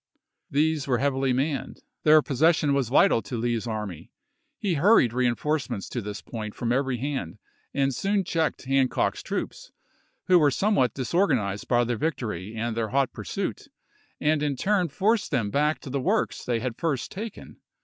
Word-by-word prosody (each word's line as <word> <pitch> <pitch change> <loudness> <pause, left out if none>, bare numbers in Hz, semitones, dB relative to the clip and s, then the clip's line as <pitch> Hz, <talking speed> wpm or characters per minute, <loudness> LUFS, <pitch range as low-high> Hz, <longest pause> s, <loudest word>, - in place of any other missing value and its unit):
These 150 0 +1
were 125 -2 +2
heavily 135 0 +1
manned; 135 +2 -2 0.2
their 155 0 +6
possession 150 +1 +2
was 135 -4 0
vital 120 -3 +4
to 120 - -5
Lee's 120 0 -1
army; 105 -7 -5 0.5
he 195 -4 -1
hurried 160 - +4
reenforcements 125 -1 -1
to 120 - -3
this 105 0 -6
point 110 -3 -6
from 120 -1 -2
every 130 0 +1
hand, 135 - -4 0.3
and 135 -1 +1
soon 195 +8 0
checked 165 -3 -1
Hancock's 135 0 +1
troops, - - -5 0.5
who 180 -1 +5
were 150 -2 +5
somewhat 135 - +1
disor 170 - +1
ganized 105 - -1
by 120 -1 +3
their 120 -1 -1
victory 110 - -3
and 115 0 -2
their 115 -1 -1
hot 135 +1 +1
pursuit, - - -4 0.5
and 150 0 +2
in 145 -2 0
turn 195 +5 +1
forced 205 +8 +1
them 115 -8 0
back 150 +4 +2
to 135 - -8
the 140 0 -1
works 210 +9 0
they 120 -2 0
had 125 -1 -4
first 145 -7 -1
taken. 215 +2 -8
135 Hz, 170 wpm, -26 LUFS, 120-155 Hz, 0.5 s, their